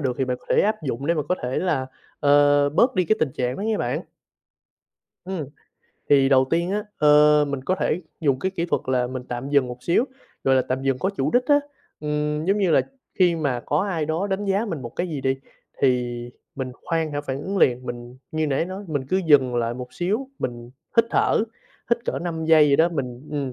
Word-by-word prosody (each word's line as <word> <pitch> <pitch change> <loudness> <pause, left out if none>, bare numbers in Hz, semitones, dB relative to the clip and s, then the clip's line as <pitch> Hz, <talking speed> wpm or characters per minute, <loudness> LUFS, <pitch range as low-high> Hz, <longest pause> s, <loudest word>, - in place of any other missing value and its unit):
được 130 -3 0
thì 135 - +2
bạn 125 -1 -2
có - - -24
thể - - +4
áp 215 -2 0
dụng 135 -1 -3
để 170 - +3
mà 155 - 0
có 180 - +3
thể 125 +1 -1
là, 155 -8 0 0.3
ờ, 145 0 +5
bớt 235 - +3
đi 185 -2 +2
cái 215 - +2
tình 140 -4 +1
trạng 125 0 -1
đó - - -6
nha 220 0 0
bạn. - - -2 1.2
Ừm, 185 -4 -4 0.6
thì 135 -2 +5
đầu 130 -1 +5
tiên 170 +2 +1
á, 210 +1 -1
ờ, 150 0 +6
mình 140 -2 -4
có 185 - +1
thể 180 -2 -1 0.2
dùng 140 -5 +2
cái 190 - -1
kỹ 180 -3 -2
thuật - - 0
là 125 -1 +1
mình 130 0 -5
tạm 120 +2 -4
dừng 140 -3 +3
một 125 0 -8
xíu, 175 - +2 0.4
gọi 135 - +4
là, 130 - +3
tạm 130 +1 -3
dừng 135 -1 0
có 190 - 0
chủ 150 -7 -1
đích 250 +1 +3
á. 290 0 +5 0.4
Ừm, 150 0 -1
giống 195 +4 +2
như 190 -4 +2
là - - +5 0.4
khi 175 -3 +4
mà 140 -6 -1
có 145 - -1
ai 180 -6 -1
đó 160 +5 -1
đánh 200 +1 -2
giá 200 +2 +1
mình 165 - -4
một 120 - -5
cái 180 - -1
gì 150 -4 -4
đi, 135 0 0 0.5
thì 125 -2 +2 0.4
mình 130 -2 -4
khoan 165 -2 -1
hả 145 - -2
phản 140 -1 -5
ứng 195 +4 -3
liền. 125 -5 +2
Mình, 120 +1 -7 0.2
như 155 0 0
nãy 140 +2 0
nói, 190 +3 -7
mình 145 -4 -2
cứ 185 - +2
dừng 135 -5 +5
lại 120 0 0
một 125 0 -8
xíu, 210 +10 -2
mình 120 -1 -5 0.3
hít 230 - +6
thở, - - +2 0.5
hít 235 0 +1
cỡ - - -2
5 165 -2 -4
giây 160 -2 +6
gì 140 - +4
đó, 165 +3 +4
mình 135 -4 -5
ừm, 140 -3 -3
150 Hz, 235 wpm, -23 LUFS, 130-180 Hz, 1.2 s, ờ